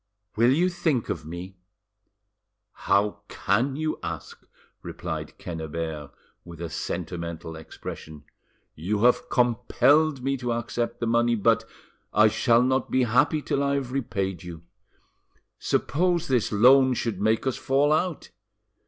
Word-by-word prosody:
"Will 120 +3 +4
you 170 +7 +3
think 160 -9 -1
of 80 -2 -4
me?" 90 +3 -8 1.3
"How 100 +1 +2
can 120 +8 0
you 155 +1 -2
ask?" - - -7 0.4
replied - - -6
Quennebert, 80 -3 -5 0.3
with 85 -2 -12
a 85 -1 -5
sentimental 85 -2 -5
expression. 80 -1 -9 0.5
"You 100 +7 -2
have 125 0 +3
compelled 130 +4 +2
me 135 +1 0
to 120 -2 -2
accept 120 +1 -3
the - - 0
money, 120 +1 +2
but—I 110 0 0
shall 115 +2 +3
not 130 0 0
be 130 - +2
happy 145 +6 +2
till 140 - -1
I 140 0 +1
have 135 -3 -3
repaid 95 -9 -2
you. 85 -2 -9 1.0
Suppose 175 +2 0
this 125 -6 +1
loan 130 +4 +5
should 110 -5 -3
make 110 +3 +1
us 130 - -1
fall 140 +3 +2
out?" 165 +1 -2
120 Hz, 130 wpm, -25 LUFS, 90-135 Hz, 1.3 s, loan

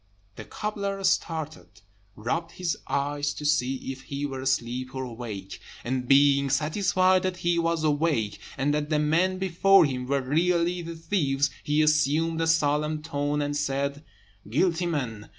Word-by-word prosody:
The - - -9
cobbler 200 -2 -4
started, 160 -9 -2 0.3
rubbed 160 +10 -3
his 180 -3 -2
eyes 145 +1 -1
to 150 - -7
see 135 -3 +2 0.2
if 135 0 -9
he 140 +1 -4
were 135 -2 -5
asleep 130 0 -1
or 130 - -3
awake; 110 -6 -7 0.2
and 125 +1 -2
being 140 0 +5
satisfied 185 +6 +2
that 185 -1 -2
he 175 -1 +3
was 165 -1 0
awake, 145 -9 0 0.2
and 140 +2 +1
that 150 0 -1
the 155 - +2
men 165 +5 +2
before 190 0 +4
him 125 -3 -3
were 140 0 +1
really 170 +5 +1
the 170 0 -7
thieves, 145 -5 0
he 150 +1 +2
assumed 155 +2 +2
a 165 - +1
solemn 150 -1 +1
tone, 145 -1 -1
and 145 0 -2
said: 140 0 -2 0.5
"Guilty 170 - +1
men! 125 -10 -3
150 Hz, 155 wpm, -26 LUFS, 135-165 Hz, 0.5 s, being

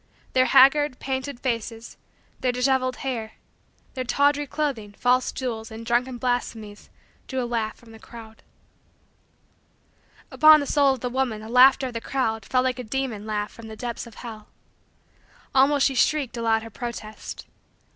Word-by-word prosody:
Their 255 0 +4
haggard, 275 0 +5
painted, 265 0 -4
faces, 230 -2 -4 0.4
their 255 - +1
disheveled 255 0 +1
hair, 225 -4 -3 0.6
their 255 - -3
tawdry 285 +3 +2
clothing, 260 -9 -3
false 250 0 +2
jewels, 225 -4 -4
and 225 +1 -9
drunken 245 +2 0
blasphemies, 230 -4 -3 0.4
drew 260 -1 -2
a - - -2
laugh 230 -2 -2
from 235 -2 -18
the 225 - -13
crowd. 220 -1 -13 1.9
Upon 310 0 +7
the 285 - -2
soul 280 -2 +3
of 250 - -14
the 250 - -2
woman 245 -4 -1
the 220 - -9
laughter 260 +3 +6
of - - -11
the 230 - -4
crowd 225 -6 -2
fell 255 -1 +1
like 255 -1 -1
a - - -4
demon 230 -3 -3
laugh 210 -1 -2
from 230 -1 -11
the 220 - -8
depths 235 +1 -5
of 230 - -14
hell. 220 -3 -9 1.1
Almost 275 +1 +4
she 270 - +2
shrieked 270 -1 +1
aloud 225 -1 +1
her 225 - -10
protest. 220 -2 -7
245 Hz, 160 wpm, -24 LUFS, 225-265 Hz, 1.9 s, Upon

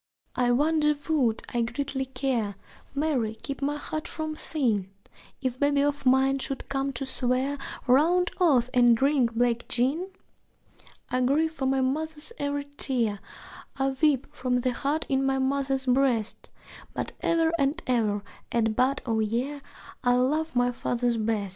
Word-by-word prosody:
(I 245 -1 +2
wonder 300 +4 +3
would 250 -8 +2
I 240 - +1
greatly 265 +3 -2
care 245 -6 -1 0.4
Mary, 270 -7 0
keep 275 +5 -6
my 290 +1 0
heart 310 +1 -5
from 315 -1 -4
sin! 230 -12 0 0.5
If 255 -1 -2
babe 285 0 +2
of 285 -1 +1
mine 265 +1 +4
should 270 0 -4
come 275 0 -1
to 270 +2 -3
swear 260 +2 0 0.3
Round 335 +8 +4
oaths 260 -9 +3
and 240 -2 +5
drink 265 -3 +2
black 240 0 +1
gin?) 280 +10 0 1.0
I 255 - +1
grieve 305 +5 +2
for 270 -4 -2
my 265 0 +2
mother's 310 - -1
every 285 0 -1
tear, 230 -6 +1 0.6
I 270 0 +1
weep 285 -4 +3
for 255 -3 -5
the 255 +1 0
hurt 290 +5 -1
in 270 -1 +1
my 270 0 +1
mother's 270 0 0
breast, 250 -4 +1 0.5
But - - -3
ever 330 -1 +2
and 280 +4 +1
ever 215 -5 +1 0.3
at 225 -2 +1
bud 260 +3 +1
o' 225 -3 0
year 245 +7 -1 0.4
I 245 -1 +4
love 300 +5 +1
my 245 0 +3
father 245 0 0
best. 215 -3 -1
265 Hz, 155 wpm, -27 LUFS, 245-285 Hz, 1.0 s, and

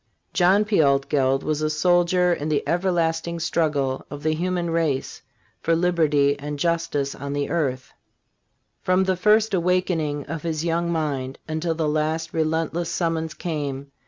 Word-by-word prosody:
John 190 +3 +4
P. 210 -5 +3
Altgeld 135 -1 +2
was 155 -1 -1
a 155 - +1
soldier 175 +2 +3
in 155 -2 -3
the 150 -2 0
everlasting 170 -2 0
struggle 145 -5 0
of 145 0 -8
the 155 0 +2
human 175 +1 -1
race 160 -5 -1 0.4
for 165 - +2
liberty 155 -5 +2
and 145 +1 -5
justice 165 -3 -1
on 140 0 -6
the 145 0 -2
earth. 130 -6 -2 0.9
From 185 +1 +2
the 190 0 +1
first 210 +4 +3
awakening 170 -5 0
of 165 0 -5
his 160 0 -2
young 170 +1 0
mind 140 -5 -2
until 160 +1 -2
the 160 -1 -1
last 155 +2 -1
relentless 160 +1 -1
summons 165 -2 -1
came. 140 -4 -4
160 Hz, 150 wpm, -23 LUFS, 145-170 Hz, 0.9 s, John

